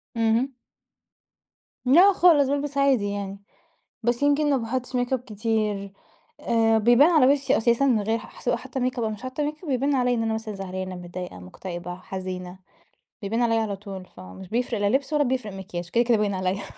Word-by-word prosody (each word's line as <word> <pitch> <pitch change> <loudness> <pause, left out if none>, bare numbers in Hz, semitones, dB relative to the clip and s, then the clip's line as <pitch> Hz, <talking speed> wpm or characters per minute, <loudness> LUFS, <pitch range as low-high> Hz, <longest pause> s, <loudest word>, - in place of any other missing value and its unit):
اهم. 230 +4 +1 1.3
لا 350 +10 +7
خالص 320 -7 +5
بالبس 285 0 -2
عادي 265 -7 +3
يعني، 200 0 -5 0.6
بس 240 +3 0
يمكن 290 +1 +3
ما 280 - +3
باحطش 255 +2 -3
ميك 245 +1 0
أب 260 - +1
كتير 215 -3 -2 0.5
آآ 225 -1 +2
بيبان 240 +8 +5
على 310 -7 +5
وشي 275 -1 +1
أساسًا 235 +4 +2
من 240 -6 +3
غير 220 +2 0
ح - - -14
سواء - - +1
حاطة 265 - -6
ميك 255 0 -1
أب - - 0
أو 220 - 0
مش 215 -1 -7
حاطة 255 +3 -3
ميك 300 +3 -4
أب 325 - -6
يبان 275 +2 +1
عليّا 250 -1 +2
إن 225 - -1
أنا 225 0 0
مثلًا 220 -1 -4
زعلانة، 185 -1 -5
متضايقة، 180 - -7
مكتئبة، 175 - -7
حزينة 185 0 -7 0.6
بيبان 225 +4 -1
عليّا 230 -1 +2
على 210 -3 -2
طول 195 -2 -8
فمش 95 - -11
بيفرق 235 +1 -1
لا 205 - +2
لبس 275 +4 0
ولا 300 -1 +3
بيفرق 250 -5 -2
مكياج 180 -2 -6
كده 235 +4 +3
كده 235 -1 +3
باين 205 -1 0
عليّا. 185 +1 -1
225 Hz, 195 wpm, -25 LUFS, 195-260 Hz, 1.3 s, لا